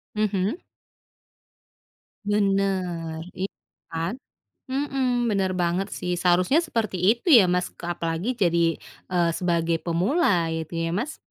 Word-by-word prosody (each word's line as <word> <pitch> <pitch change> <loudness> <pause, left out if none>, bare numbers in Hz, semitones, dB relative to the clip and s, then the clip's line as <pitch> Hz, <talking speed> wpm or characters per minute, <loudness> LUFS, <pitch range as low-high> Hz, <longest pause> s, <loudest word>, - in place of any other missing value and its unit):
Mhm. 210 - 0 1.7
Bener. 190 -5 0 0.2
Iya 195 - -2 0.4
kan? 165 +5 -2 0.6
Mhm. 275 0 -1 0.3
Bener 195 -2 +1
banget 175 +3 0
sih. 180 - -2
Seharusnya 180 - +4
seperti 220 -9 -1
itu 235 - +2
ya, 205 - +6
Mas, 180 0 +1 0.2
apalagi 165 +4 -2
jadi, 170 -1 +3 0.5
eee, 175 -2 +2
sebagai 170 -2 +1
pemula, 175 - +1
ya 160 - -2
itu 170 - -12
ya, 165 - -1
Mas? 285 +7 -4
185 Hz, 115 wpm, -25 LUFS, 170-210 Hz, 1.7 s, ya